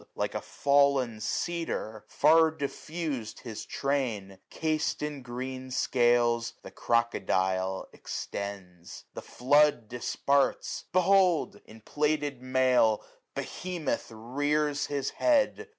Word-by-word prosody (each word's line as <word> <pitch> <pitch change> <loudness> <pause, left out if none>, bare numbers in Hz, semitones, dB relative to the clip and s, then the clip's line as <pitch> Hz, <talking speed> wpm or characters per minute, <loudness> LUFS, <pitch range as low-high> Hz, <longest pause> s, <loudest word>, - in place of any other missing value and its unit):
Like - - -2
a - - -3
fall'n 140 -5 +2
cedar, 140 -7 -3
far 160 +2 +5
diffus'd 150 -4 -5
his 115 -4 -7
train, 115 -9 -2
Cas'd 155 -1 -1
in 150 -2 -4
green 130 +1 -6
scales, 120 -2 +2
the - - -10
crocodile 95 -5 0
extends. 95 -4 -7
The - - -6
flood 145 -2 +3
disparts: 135 +4 0
behold! 185 -2 +3
in 110 0 -14
plaited 145 0 -1
mail. 130 -4 +2 0.3
Behemoth 175 -9 -3
rears 145 +6 -1
his 140 -2 -2
head. 310 +9 +1
130 Hz, 100 wpm, -29 LUFS, 115-150 Hz, 0.3 s, far